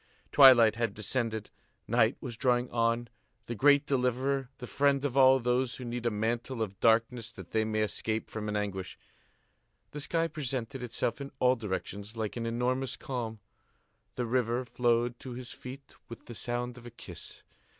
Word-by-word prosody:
Twilight 120 -6 +8
had 115 -4 -1
descended; 110 0 -2 0.4
night 115 +1 +3
was 125 -4 -5
drawing 125 +1 +1
on, 115 0 +1 0.4
the 120 - -4
great 140 +4 +5
deliverer, 130 0 0
the 125 - -7
friend 140 +2 +2
of 135 -3 -2
all 135 -1 +7
those 125 +1 0
who 125 - -7
need 120 0 -3
a - - +4
mantle 115 +3 -1
of 100 -2 -7
darkness 115 0 +2
that 95 -5 -12
they 110 - +2
may 110 0 -1
escape 110 +1 -1
from 105 -1 -5
an 105 - -2
anguish. 95 -3 -3 0.9
The 150 - -6
sky 165 +3 +1
presented 135 -4 -4
itself 120 +2 -2
in 140 - -6
all 125 -1 +4
directions 105 0 -5
like 110 -2 -3
an 115 -1 -3
enormous 125 +3 -1
calm. 115 -5 -5 0.7
The 125 - -1
river 120 +1 0
flowed 120 0 +1
to 130 - -7
his 125 0 -8
feet 135 +2 -10 0.2
with 115 - -10
the 120 - -8
sound 120 +2 -3
of 120 - -12
a - - -7
kiss. 120 - -9
120 Hz, 170 wpm, -30 LUFS, 115-130 Hz, 0.9 s, Twilight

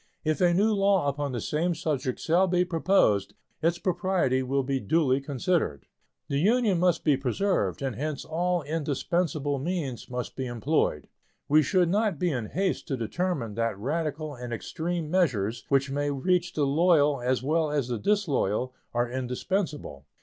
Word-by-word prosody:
If 155 +3 0
a 175 -1 +5
new 205 +5 +3
law 195 -5 +2
upon 140 0 -3
the 120 - -3
same 165 +9 -1
subject 135 -6 -2
shall 175 +4 +3
be 180 0 +2
proposed, 165 - +2 0.3
its 170 +1 +2
propriety 175 -7 +1
will 135 +1 0
be 135 0 -1
duly 135 +3 +2
considered. 140 - -1 0.4
The 140 - 0
Union 210 0 +3
must 180 -1 +2
be 150 -3 +4
preserved, 140 - -1
and 135 -3 -2
hence 150 +1 -4
all 175 +1 0
indispensable 145 0 -1
means 145 -5 -3
must 125 -1 -5
be 130 -1 -3
employed. 120 - 0 0.4
We 155 +2 +5
should 175 +4 +2
not 205 -2 +1
be 175 +3 0
in 120 -6 -3
haste 190 - -1
to 135 -4 -2
determine 125 - -2
that 115 -2 -1
radical 150 +5 -3
and 125 -2 -7
extreme 160 +6 -3
measures, 120 - +1
which 135 0 +2
may 145 +1 -1
reach 175 +6 0
the 150 - +1
loyal 145 -2 +3
as 125 0 0
well 155 +2 +1
as 145 -4 0
the 120 -3 -2
disloyal, 135 - 0 0.2
are 120 +1 +2
indispensable. 130 - -3
150 Hz, 165 wpm, -27 LUFS, 130-175 Hz, 0.4 s, a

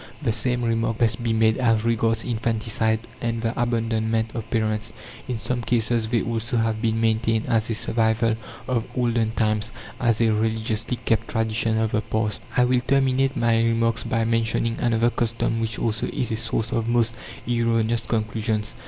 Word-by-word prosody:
The - - 0
same 125 +2 -1
remark 115 -1 0
must 115 0 +1
be 115 -1 0
made 110 +1 +3
as 115 -3 +2
regards 115 -1 +1
infanticide 110 -1 0 0.2
and 115 -1 -1
the 115 0 0
abandonment 115 -2 0
of 115 -2 -5
parents. 110 -1 -1 0.4
In 125 -3 -2
some 120 +3 -2
cases 115 -1 +1
they 115 -1 +1
also 115 0 -2
have 110 -1 0
been 115 -1 +1
maintained 115 0 +1
as 115 0 +1
a 115 - 0
survival 110 0 +1 0.3
of 120 -3 0
olden 120 -2 +1
times, 110 0 0 0.3
as 115 -4 +2
a 115 -2 +3
religiously 110 +2 -1
kept 115 0 +1
tradition 115 0 0
of 110 -1 0
the 105 - +1
past. 110 -1 -1 0.2
I 125 - +6
will 125 0 +2
terminate 135 +1 +2
my 115 -1 +3
remarks 115 0 +1
by 115 -1 0
mentioning 115 0 0
another 120 0 +2
custom 115 -1 -1
which 115 0 -2
also 115 -1 -1
is 130 -6 -2
a - - +1
source 115 0 -1
of 115 -1 -1
most 115 -1 +2 0.3
erroneous 115 -1 +1
conclusions. 110 -1 -1
115 Hz, 170 wpm, -24 LUFS, 110-115 Hz, 0.4 s, I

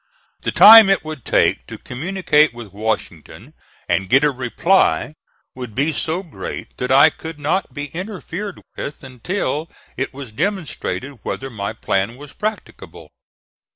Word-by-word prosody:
The - - -2
time 220 -1 +10
it 195 -4 +2
would 155 -6 -7
take - - +2
to - - -8
communicate 155 -1 +1
with 115 -5 -10
Washington 105 -7 -4 0.3
and 90 +2 0
get 135 +5 +5
a 150 - +4
reply 140 +6 +1 0.4
would 125 -5 -8
be 150 +4 +1
so 165 +6 -2
great 165 - -8
that 125 +1 -2
I 140 +4 +7
could 160 0 -9
not 150 +6 -1
be 145 -1 -5
interfered 190 +1 -6
with 145 - -6
until 150 - -3 0.3
it 135 - -2
was 135 -4 -9
demonstrated 150 - -3
whether 135 0 -5
my 100 -1 -4
plan 110 +1 -1
was 145 0 -12
practicable. 215 +1 -6
145 Hz, 145 wpm, -20 LUFS, 125-175 Hz, 0.4 s, time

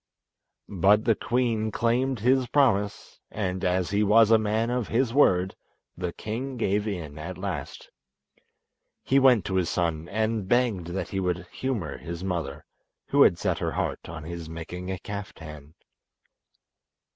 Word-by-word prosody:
But 100 +3 +3
the 115 - +5
queen 115 -1 0
claimed 120 +2 0
his 130 +2 +3
promise, 110 -7 +1
and 95 -3 -3
as 90 0 0
he 100 +1 +2
was 110 +1 +5
a 110 - +7
man 110 +2 0
of 125 -3 -1
his 120 0 +1
word 95 -9 +3 0.4
the 90 -1 -3
king 125 +8 -5
gave 105 -1 0
in 80 -7 -5
at 85 +4 -6
last. 90 -7 -6 1.1
He 135 - +3
went 125 -7 +5
to 95 - -1
his 90 -3 +1
son 85 -1 -1
and 110 -1 -1
begged 115 -7 +1
that 90 +2 -4
he 95 - -2
would 90 -2 -1
humour 110 - -3
his 85 +1 -6
mother, 85 -7 -3 0.4
who - - +4
had - - +6
set - - -1
her - - -2
heart - - -3
on 80 -2 -7
his 85 0 -7
making 90 +3 -7
a 95 - -2
kaftan. 80 -7 -8
100 Hz, 155 wpm, -26 LUFS, 90-115 Hz, 1.1 s, a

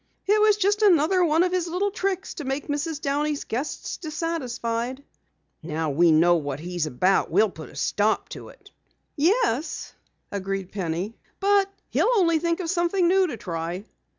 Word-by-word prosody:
"It 420 +2 +3
was 425 -1 +5
just 415 +1 +1
another 365 -2 +4
one 325 0 +3
of 365 - 0
his 365 -2 0
little 370 +4 -1
tricks 380 -2 -2
to 310 - -7
make 270 +1 -3
Mrs. 295 +1 -2
Downey's 290 +1 -1
guests 260 +7 -4
dissatisfied." 260 -6 -3 0.6
"Now 160 -1 -2
we 165 +4 +4
know 170 +2 +5
what 145 -3 -4
he's 175 -1 -3
about 180 +8 +2
we'll 205 +4 +3
put 160 -3 -10
a - - -15
stop 210 +1 0
to - - -9
it!" - - -18 0.4
"Yes," 320 - 0 0.4
agreed 195 -1 -3
Penny, 185 +2 -3 0.3
"but 400 0 +3 0.2
he'll - - +2
only 335 -6 +3
think 335 +2 0
of 335 - -4
something 345 0 +1
new 375 +1 +4
to 270 - -5
try." 175 0 -4
290 Hz, 165 wpm, -25 LUFS, -, 0.6 s, was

